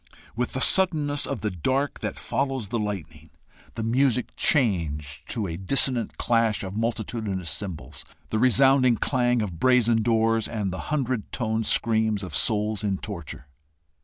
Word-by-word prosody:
With 125 Hz, +1 st, -2 dB
the 130 Hz, -, -3 dB
suddenness 150 Hz, -6 st, +4 dB
of 140 Hz, -, -4 dB
the 105 Hz, -, -1 dB
dark 130 Hz, -, -1 dB
that -, -, -4 dB
follows 135 Hz, -6 st, -2 dB
the 120 Hz, +1 st, -1 dB
lightning, 85 Hz, -7 st, -5 dB, 0.5 s
the 115 Hz, -, -3 dB
music 125 Hz, +2 st, +1 dB
changed 80 Hz, -, +1 dB
to 110 Hz, -4 st, -1 dB
a 85 Hz, -3 st, -4 dB
dissonant 120 Hz, +4 st, -1 dB
clash 115 Hz, -3 st, +1 dB
of 95 Hz, +1 st, -6 dB
multitudinous 110 Hz, -5 st, -3 dB
cymbals, 75 Hz, -, -5 dB, 0.3 s
the 110 Hz, -, 0 dB
resounding 130 Hz, 0 st, +4 dB
clang 120 Hz, -2 st, +1 dB
of 90 Hz, -6 st, -6 dB
brazen 120 Hz, -3 st, +3 dB
doors, 115 Hz, 0 st, +1 dB
and 105 Hz, -5 st, -3 dB
the 95 Hz, -, -5 dB
hundred 130 Hz, -7 st, -2 dB
toned 110 Hz, -2 st, -1 dB
screams 110 Hz, -3 st, +1 dB
of 90 Hz, -5 st, -5 dB
souls 105 Hz, +3 st, +1 dB
in 100 Hz, -2 st, 0 dB
torture. 85 Hz, -9 st, -8 dB
110 Hz, 150 wpm, -25 LUFS, 95-125 Hz, 0.5 s, suddenness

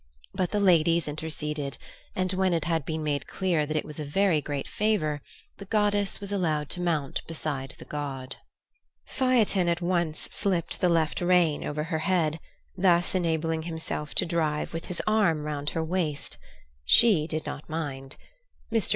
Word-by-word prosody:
But 185 Hz, -2 st, 0 dB
the 210 Hz, -, 0 dB
ladies 170 Hz, -4 st, +4 dB
interceded, 150 Hz, -1 st, -4 dB, 0.4 s
and 185 Hz, 0 st, 0 dB
when 185 Hz, -1 st, +2 dB
it 165 Hz, -, -1 dB
had 165 Hz, -4 st, 0 dB
been 160 Hz, -1 st, -3 dB
made 145 Hz, -2 st, -1 dB
clear 170 Hz, -6 st, 0 dB
that 155 Hz, +1 st, -1 dB
it -, -, -1 dB
was 150 Hz, 0 st, -7 dB
a -, -, -2 dB
very 165 Hz, +2 st, +2 dB
great 140 Hz, -1 st, -4 dB
favour, 175 Hz, -9 st, 0 dB, 0.4 s
the 200 Hz, -, -9 dB
goddess 205 Hz, -1 st, +1 dB
was 200 Hz, 0 st, -5 dB
allowed 155 Hz, -7 st, 0 dB
to 180 Hz, -, -3 dB
mount 160 Hz, -6 st, 0 dB
beside 145 Hz, -5 st, -3 dB
the -, -, -11 dB
god. 135 Hz, -3 st, -5 dB, 0.7 s
Phaethon 230 Hz, -8 st, +2 dB
at 170 Hz, 0 st, +1 dB
once 170 Hz, -3 st, 0 dB
slipped 185 Hz, -5 st, -1 dB
the 180 Hz, -, +4 dB
left 165 Hz, -2 st, +1 dB
rein 175 Hz, -4 st, +3 dB
over 150 Hz, +1 st, -2 dB
her 160 Hz, 0 st, -2 dB
head, 165 Hz, -3 st, +1 dB, 0.4 s
thus 175 Hz, -2 st, +3 dB
enabling 165 Hz, -3 st, 0 dB
himself 160 Hz, -2 st, -4 dB
to -, -, +3 dB
drive 160 Hz, -3 st, -1 dB
with 165 Hz, -, -4 dB
his 180 Hz, -, -4 dB
arm 200 Hz, -8 st, +2 dB
round 145 Hz, -1 st, -2 dB
her 160 Hz, -, +1 dB
waist. 160 Hz, -3 st, -2 dB, 0.4 s
She 160 Hz, -, +6 dB
did 155 Hz, -1 st, -3 dB
not 145 Hz, -, -6 dB
mind. 140 Hz, -4 st, -4 dB, 0.5 s
Mr. 225 Hz, -5 st, +1 dB
165 Hz, 170 wpm, -27 LUFS, 150-185 Hz, 0.7 s, She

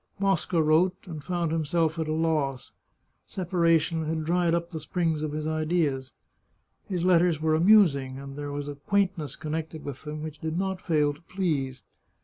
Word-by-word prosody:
Mosca 195 Hz, -3 st, +1 dB
wrote, 170 Hz, +4 st, +3 dB
and 160 Hz, -5 st, -7 dB
found 175 Hz, -2 st, -1 dB
himself 160 Hz, +1 st, 0 dB
at 160 Hz, -, -1 dB
a -, -, -1 dB
loss; 155 Hz, -5 st, 0 dB, 0.6 s
separation 165 Hz, -3 st, +1 dB
had 160 Hz, 0 st, -2 dB
dried 170 Hz, 0 st, +2 dB
up 170 Hz, +1 st, -3 dB
the 160 Hz, -, -4 dB
springs 160 Hz, 0 st, -1 dB
of 155 Hz, -1 st, -2 dB
his 155 Hz, 0 st, -3 dB
ideas. 155 Hz, -4 st, 0 dB, 0.8 s
His 180 Hz, -3 st, -2 dB
letters 175 Hz, -3 st, +4 dB
were 155 Hz, 0 st, +1 dB
amusing, 155 Hz, -7 st, +4 dB
and 135 Hz, 0 st, -8 dB
there 145 Hz, 0 st, -5 dB
was 145 Hz, 0 st, -4 dB
a 145 Hz, -, -4 dB
quaintness 180 Hz, +1 st, -1 dB
connected 155 Hz, +1 st, -5 dB
with 140 Hz, -2 st, -6 dB
them 150 Hz, 0 st, -6 dB
which 155 Hz, -1 st, -7 dB
did 160 Hz, +1 st, -3 dB
not 190 Hz, 0 st, -2 dB
fail 150 Hz, -4 st, +2 dB
to 145 Hz, -, -17 dB
please. 150 Hz, -9 st, -2 dB
160 Hz, 170 wpm, -27 LUFS, 150-175 Hz, 0.8 s, letters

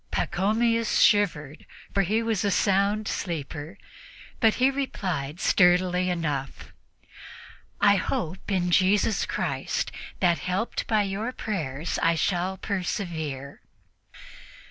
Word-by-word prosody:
Pachomius 225 Hz, +4 st, +1 dB
shivered, 155 Hz, -8 st, +2 dB, 0.3 s
for 200 Hz, -, +3 dB
he 215 Hz, +5 st, +1 dB
was 225 Hz, -3 st, 0 dB
a 205 Hz, -, +2 dB
sound 200 Hz, +2 st, +1 dB
sleeper, 160 Hz, +1 st, -4 dB, 0.6 s
but 225 Hz, -2 st, +4 dB
he 260 Hz, +2 st, +3 dB
replied 180 Hz, -, -3 dB
sturdily 180 Hz, 0 st, +3 dB
enough: 150 Hz, -6 st, -3 dB, 1.1 s
"I 200 Hz, -1 st, +5 dB
hope 180 Hz, 0 st, -3 dB
in 180 Hz, -2 st, +1 dB
Jesus 195 Hz, +4 st, +3 dB
Christ -, -, -2 dB, 0.3 s
that, 175 Hz, -3 st, +2 dB
helped 185 Hz, +5 st, -2 dB
by 215 Hz, -2 st, +2 dB
your 200 Hz, +5 st, -3 dB
prayers, 165 Hz, -, -3 dB
I 165 Hz, 0 st, +3 dB
shall 180 Hz, +2 st, 0 dB
persevere." 170 Hz, -, -4 dB
185 Hz, 105 wpm, -26 LUFS, 170-210 Hz, 1.1 s, I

